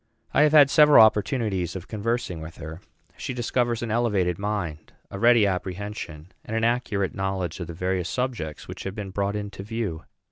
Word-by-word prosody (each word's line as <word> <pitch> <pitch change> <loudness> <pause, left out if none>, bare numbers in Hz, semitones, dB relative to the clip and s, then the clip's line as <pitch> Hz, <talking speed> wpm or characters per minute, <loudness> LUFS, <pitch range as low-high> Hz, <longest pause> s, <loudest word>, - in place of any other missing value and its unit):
I 145 - +4
have 150 0 +5
had 145 -3 +7
several 150 -6 +8
opportunities 105 - 0
of 95 -1 -7
conversing 110 -5 -2
with 80 +1 -9
her. 80 +3 -8 0.4
She 130 - -5
discovers 120 -1 0
an 115 - -3
elevated 100 -7 +1
mind, 100 -7 -4 0.2
a 100 - -6
ready 115 -1 +5
apprehension, 95 -3 -4
and 110 - -3
an 115 - -1
accurate 115 -5 0
knowledge 95 -3 -3
of 85 - -5
the 85 - -7
various 90 0 -1
subjects 120 - -3
which - - -8
have 95 0 -4
been 100 -3 -6
brought 100 +1 -1
into 100 -2 -5
view. 100 -8 -4
100 Hz, 180 wpm, -25 LUFS, 90-115 Hz, 0.4 s, several